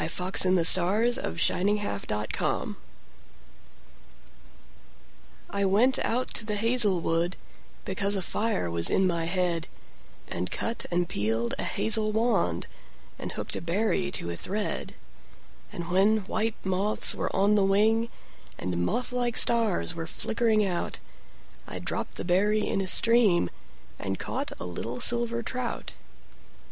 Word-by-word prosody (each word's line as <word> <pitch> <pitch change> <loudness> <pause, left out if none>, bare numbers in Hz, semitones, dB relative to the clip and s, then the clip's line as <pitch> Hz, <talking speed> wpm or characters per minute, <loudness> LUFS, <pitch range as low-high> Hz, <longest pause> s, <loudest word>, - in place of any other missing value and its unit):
9. - - -2
The 185 -1 +2
Song 200 +8 +6
of 80 +1 -5
Wandering 205 +3 0
Aengus 105 - -4 2.8
I 200 0 -1
WENT 220 +8 +2
out 250 +2 -2
to - - 0
the 215 -1 -3
hazel 220 -3 +4
wood, 170 +2 -1 0.5
Because 200 +1 +1
a 190 - -1
fire 210 - -2
was 85 0 +3
in 190 - +2
my 170 -2 -1
head, 175 -2 -1 0.6
And 90 +1 -4
cut 230 +1 -3
and 175 0 -1
peeled 110 +1 -2
a - - +1
hazel 215 -1 +3
wand, 215 - 0 0.5
And - - -6
hooked - - -5
a - - -5
berry 185 +2 -1
to 85 - -3
a - - -5
thread; 205 - -4 0.8
And 170 0 -7
when 200 +2 +2
white 220 +2 -1
moths 190 +3 +2
were - - -3
on 200 +2 +2
the 205 -2 +2
wing, 220 +4 +1 0.5
And 90 -1 -3
moth 245 - -2
like 245 -1 -1
stars 225 -7 +3
were 165 -1 -6
flickering 220 +3 0
out,I 180 -3 -8
dropped - - -5
the - - -6
berry 205 +4 +1
in 195 - -1
a - - -2
streamAnd 215 - +4 0.7
caught - - -5
a - - -6
little 115 +8 -6
silver 235 -1 +4
trout. 250 +1 -5
195 Hz, 135 wpm, -26 LUFS, 170-220 Hz, 2.8 s, Song